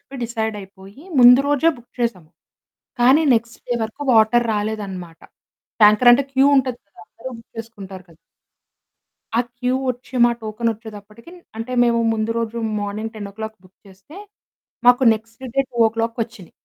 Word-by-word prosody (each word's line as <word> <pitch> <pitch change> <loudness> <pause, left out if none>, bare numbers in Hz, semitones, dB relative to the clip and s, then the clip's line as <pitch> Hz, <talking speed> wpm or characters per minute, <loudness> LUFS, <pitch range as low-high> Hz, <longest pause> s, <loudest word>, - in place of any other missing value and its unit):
చెప్పి 275 - -12
డిసైడైపోయి 210 - -6 0.2
ముందు 245 +2 +8
రోజే 290 +3 +3
బుక్ 240 - -20
చేసాము. 185 -9 -3 0.7
కానీ 260 +6 +5
నెక్స్ట్ 230 0 -2
డే 245 - 0
వరకు 220 +6 -8
వాటర్ 230 +2 +4
రాలేదనమాట. 200 -5 -5 0.6
ట్యాంకర్ 215 +4 +7
అంటే 270 +3 +3
క్యూ 270 +1 +4
ఉంటది 255 -2 0
కదా! 200 - -19
అందరూ 260 +3 -10
బుక్ 230 - -18
చేసుకుంటారు 200 -5 -9
కదా! 165 - -19 1.2
ఆ - - +5 0.2
క్యూ 250 0 -1 0.2
వచ్చి 250 +2 -10
మా 240 - +4
టోకెన్ 220 +2 -2
వచ్చేదప్పటికి 220 - -13 0.2
అంటే 225 +3 -6
మేము 235 -1 +2
ముందు 220 0 -2
రోజు 230 0 -3 0.2
మార్నింగ్ 210 +2 -5
10 215 0 -8
బుక్ 185 +1 -23
చేస్తే 195 - -16 0.7
మాకు 245 +2 +6
నెక్స్ట్ 225 +3 -12
డే - - +5
2 230 0 0
వచ్చినాయి. 185 -5 -15
225 Hz, 145 wpm, -20 LUFS, 210-240 Hz, 1.2 s, ముందు